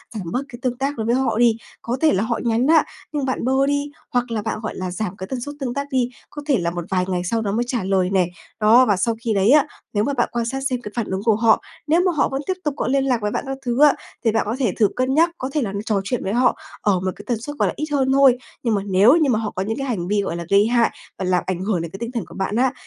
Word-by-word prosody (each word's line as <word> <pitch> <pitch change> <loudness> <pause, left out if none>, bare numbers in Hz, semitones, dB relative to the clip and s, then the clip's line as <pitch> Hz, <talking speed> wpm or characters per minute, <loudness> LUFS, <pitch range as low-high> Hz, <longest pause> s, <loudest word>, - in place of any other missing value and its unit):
giảm 180 -6 -5
bớt 255 - 0
cái 240 - -10
tương 250 -1 -1
tác 275 +2 -2
đối 220 - -2
với 235 +2 +2
họ 260 -4 0
đi. 235 -2 +4 0.2
Có 240 +2 -2
thể 320 - +4
là 195 - +1
họ 235 +1 -1
nhắn 235 +2 +1
á 320 +1 +6 0.3
nhưng 290 -3 -1
bạn 260 -2 -2
bơ 265 +1 +3
đi, 285 0 -1 0.2
hoặc 245 -1 0
là 220 -2 -1
bạn 215 - -3
gọi 220 - -4
là 185 -1 -4
giảm 185 +1 -3
cái 190 - -6
tần 255 +2 -4
suất 290 +4 -6
tương 255 -4 -3
tác 280 +1 -3
đi, 250 -2 +1 0.2
có 295 - -8
thể 280 -4 +3
là 170 -3 -1
một 175 -1 -5
vài 185 -1 +1
ngày 180 -2 -1
sau 225 +5 0
đó 205 -2 -1
mới 230 +4 +1
trả 245 -4 -1
lời 190 -1 +1
này. 185 -3 +2 0.3
Đó, 225 +4 +6
và 205 -5 +2
sau 230 +4 0
khi 230 -2 0
đấy 200 +3 +3
á, 300 0 +5 0.3
nếu 205 -1 +2
mà 280 - 0
bạn 240 -3 +1
quan 235 -1 -1
sát 265 +3 -3
xem 250 -2 -2
cái 210 - -7
phản 235 -3 -1
ứng 190 +1 -2
của 225 -2 +4
họ, 220 0 +4 0.3
nếu 330 +3 +4
mà 365 - +3
họ 300 - +1
vẫn 270 +1 -2
tiếp 375 - +1
tục 295 - -1
có - - -1
liên 270 +1 +2
lạc 250 -4 +1
với 210 0 -1
bạn - - -2
các 270 0 -3
thứ 245 +3 0
á, 295 -2 +7 0.3
thì 225 - +4
bạn 225 - +1
có 220 +3 -2
thể 245 -7 +2
thử 210 - +6
cân 255 +1 0
nhắc, 330 +4 +4
có 260 - -4
thể 300 - +1
là 215 -6 -2
trò 205 -4 +1
chuyện 230 +4 -2
với 195 - -2
họ 250 +1 +3 0.2
ở 195 -3 +2
một 185 0 -1
cái - - -12
tần 235 -3 -1
suất, 290 +5 -6
gọi - - +2
là, - - -2
ít 305 - -1
hơn 265 -2 +2
thôi. 270 -2 +6 0.3
Nhưng 230 -3 +1
mà 200 - 0
nếu 200 +7 +5
như 310 -4 +3
mà 220 -4 +2
họ 215 -2 -3
có 185 - -3
những 225 +4 -3
cái 275 -1 -3
hành 185 -8 -2
vi, 205 +1 +1
gọi 180 -4 -3
là, 170 0 -5
gây 200 +2 +5
hại 235 -1 +3 0.3
và 190 - -2
làm 180 -1 +1
ảnh 185 -2 -1
hưởng 195 -4 0
đến 165 -1 -6
cái 195 - -7
tinh 235 0 -4
thần 230 -7 -3
của 170 - -13
bạn 195 +2 -2
á, 255 +2 +2
235 Hz, 325 wpm, -21 LUFS, 200-265 Hz, 0.3 s, á